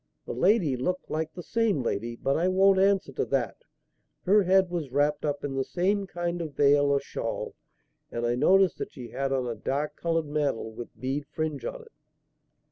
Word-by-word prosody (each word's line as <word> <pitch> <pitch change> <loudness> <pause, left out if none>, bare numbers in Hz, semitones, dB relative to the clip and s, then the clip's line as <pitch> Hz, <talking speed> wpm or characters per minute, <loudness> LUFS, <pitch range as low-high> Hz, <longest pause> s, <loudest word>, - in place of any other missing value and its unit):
The - - -4
lady 170 - +3
looked 180 +9 -3
like 160 0 -2
the 175 - -9
same 220 - +1
lady, 115 +1 -2
but 135 +3 0
I 170 +3 +2
won't 190 +1 +4
answer 195 -5 +3
to - - -1
that. 125 -7 -1 0.7
Her 205 +3 +5
head 190 -1 +3
was 165 -6 -3
wrapped 145 +2 +1
up 145 -2 -2
in 145 -1 -3
the 135 0 0
same 195 +6 0
kind 175 -1 -3
of 155 -4 -6
veil 145 0 +5
or 140 0 +3
shawl, - - -4 0.6
and 120 0 -2
I 120 - +2
noticed 190 +9 +4
that - - -5
she 125 -4 -9
had 135 +3 -2
on 130 -2 0
a 120 - -2
dark 145 +6 -2
coloured 165 -1 0
mantle 145 -6 -1
with 115 +2 -10
bead 135 +3 -3
fringe 155 -3 -3
on - - -5
it. 455 - -18
150 Hz, 200 wpm, -27 LUFS, 135-185 Hz, 0.7 s, Her